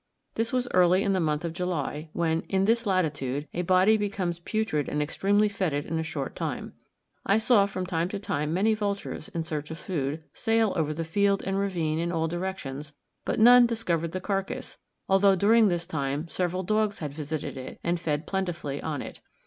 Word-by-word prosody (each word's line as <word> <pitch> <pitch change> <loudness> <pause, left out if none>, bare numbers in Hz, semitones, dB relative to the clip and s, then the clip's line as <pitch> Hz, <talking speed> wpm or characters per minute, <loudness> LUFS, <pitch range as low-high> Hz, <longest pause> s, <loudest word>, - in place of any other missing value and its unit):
This 225 +1 -1
was 250 -1 0
early 180 +1 +5
in 200 - +1
the 190 - +1
month 155 -1 0
of 165 - -3
July, 165 -3 -3
when, 165 -1 0
in 190 0 +2
this 230 +1 +2
latitude, 150 -6 0
a 175 - -1
body 185 +4 +4
becomes 195 -5 -2
putrid 205 -5 -1
and 150 - -1
extremely 200 +7 +2
fetid 180 -8 -1
in 165 - -2
a - - 0
short 145 -4 -4
time. - - -4 0.5
I 200 - +3
saw 220 -3 +4
from 185 -2 -4
time 175 -1 -1
to 205 - -3
time 150 -6 -2
many 200 +6 +3
vultures, 200 -2 -3
in 170 -5 -3
search 155 -2 -4
of 160 - -6
food, 155 -3 -3
sail 225 -3 +1
over 155 -3 0
the 160 +2 -3
field 200 +4 +1
and 195 0 0
ravine 170 -6 -1
in 170 +1 -1
all 165 -1 0
directions, 160 -5 -5 0.3
but - - -1
none 245 +2 +8
discovered 170 -8 -1
the 185 - -3
carcass, 195 0 -3 0.3
although 195 0 +5
during 215 +4 +5
this 175 -2 0
time 145 -2 -2
several 180 +1 -1
dogs 215 +1 +1
had 150 -3 -5
visited 150 0 -4
it 130 -1 -8
and 170 0 0
fed 155 -2 -2
plentifully 175 -7 -3
on 150 -4 -3
it. - - -10
175 Hz, 195 wpm, -27 LUFS, 155-200 Hz, 0.5 s, none